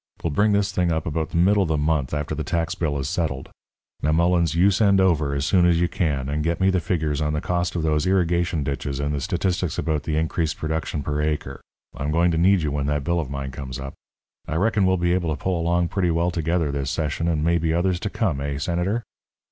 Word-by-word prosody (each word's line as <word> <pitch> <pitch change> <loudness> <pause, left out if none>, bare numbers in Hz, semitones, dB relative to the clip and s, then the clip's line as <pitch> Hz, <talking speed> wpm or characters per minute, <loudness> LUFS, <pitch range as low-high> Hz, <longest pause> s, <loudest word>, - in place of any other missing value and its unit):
We'll 85 - 0
bring 105 +8 +2
this 100 0 +1
thing 90 -2 +1
up 80 -1 -1
about 80 0 -2
the - - -2
middle 100 +4 +4
of 90 - 0
the 80 - +1
month, 75 -3 0
after 75 0 -2
the 75 +1 -3
tax 85 -2 -1
bill 75 -4 -1
is 70 -1 -3
settled. 70 -4 -2 0.5
Now, 75 - +1
Mullens, 85 -1 +2
you 95 +4 +5
send 100 0 +3
over, 80 -7 +2
as 70 0 -1
soon 90 +1 +3
as 85 -1 +3
you 85 - +2
can, 70 -7 -1
and 75 +2 -1
get 85 +1 -1
me 95 0 +3
the 95 - +2
figures 80 -4 -1
on 75 0 0
the 75 - 0
cost 90 +2 -1
of 85 - -1
those 75 +1 +1
irrigation 85 -3 +1
ditches 70 0 -3
and 70 +1 -1
the 70 - -2
statistics 90 +1 -1
about 80 -3 -1
the 75 +2 -2
increased 80 0 -1
production 80 -1 -3
per 75 +1 -1
acre. 75 -3 -2 0.3
I'm 70 - -3
going 85 +2 +3
to 80 - 0
need 95 0 +4
you 75 - -1
when 70 -1 -1
that 75 -1 0
bill 85 +3 0
of 75 -6 -3
mine 70 -1 -4
comes 65 0 -6
up. 70 0 -6 0.5
I 80 - -3
reckon 100 +2 +2
we'll 95 0 +3
be 85 0 +1
able 85 -4 0
to - - -13
pull 90 -3 0
along 85 0 +1
pretty 90 0 0
well 85 +2 +1
together 80 -2 0
this 70 -1 -2
session 80 +2 -1
and 80 -3 0
maybe 85 -1 +1
others 85 +2 +1
to 105 - -3
come, 95 -11 -1
eh, 70 0 -3
Senator?" 90 +9 -1
80 Hz, 245 wpm, -23 LUFS, 75-90 Hz, 0.5 s, you